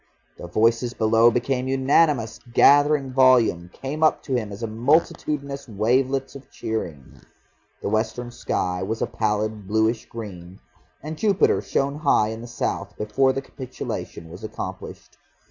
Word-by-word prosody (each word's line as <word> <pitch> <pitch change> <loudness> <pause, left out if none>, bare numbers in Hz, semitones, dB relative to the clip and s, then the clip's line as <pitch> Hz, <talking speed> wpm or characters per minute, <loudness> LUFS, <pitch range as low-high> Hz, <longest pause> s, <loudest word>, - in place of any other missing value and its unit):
The 85 - -7
voices 115 +6 +1
below 115 +1 +4
became 125 +2 -1
unanimous, 135 -3 +2 0.2
gathered 145 -2 +5
volume, 125 -10 +4
came 140 +4 -6
up 155 - +3
to 135 - -4
him 110 -5 -1
as 100 +3 -8
multitudinous 140 +3 0
wavelets 130 +6 0
of 140 -1 -12
cheering. 85 -11 -6 0.6
The - - -1
western 110 +3 -2
sky 90 -6 -2
was 110 +4 -2
a - - +2
pallid 105 -1 -2
bluish 110 +2 +1
green, 95 -5 -9 0.4
and 155 +1 -6
Jupiter 200 -3 +3
shone 140 +1 -1
high 140 -8 +3
in 110 +1 -6
the 120 - -8
south, 120 - -4
before 120 +6 +2
the 135 +1 -4
capitulation 125 - -7
was 90 +5 -11
accomplished. 110 0 -8
120 Hz, 140 wpm, -23 LUFS, 110-135 Hz, 0.6 s, gathered